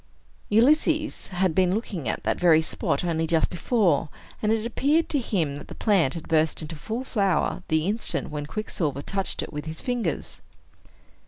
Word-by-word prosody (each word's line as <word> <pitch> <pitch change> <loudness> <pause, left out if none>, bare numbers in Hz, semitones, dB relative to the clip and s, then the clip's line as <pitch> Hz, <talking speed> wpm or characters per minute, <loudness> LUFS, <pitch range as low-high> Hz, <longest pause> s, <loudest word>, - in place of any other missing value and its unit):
Ulysses 305 +7 +3
had 185 -2 0
been 185 +1 +3
looking 185 - -3
at - - -3
that - - 0
very 160 -3 +5
spot 145 - -1
only 165 -2 0
just 160 -1 +2
before; 175 - +1 0.3
and 215 - +1
it 225 0 0
appeared 290 +7 +1
to 290 - +1
him 165 - -1
that - - -10
the - - -9
plant 185 - +2
had 165 - -7
burst 160 -1 +2
into 160 +2 -6
full 220 - -4
flower 200 -8 0
the 160 -1 +1
instant 210 -3 -1
when 145 -1 -4
Quicksilver 155 -8 -3
touched 195 -1 -1
it - - -9
with 150 +1 -5
his 160 0 -5
fingers. 235 - -3
180 Hz, 175 wpm, -25 LUFS, 160-225 Hz, 0.3 s, very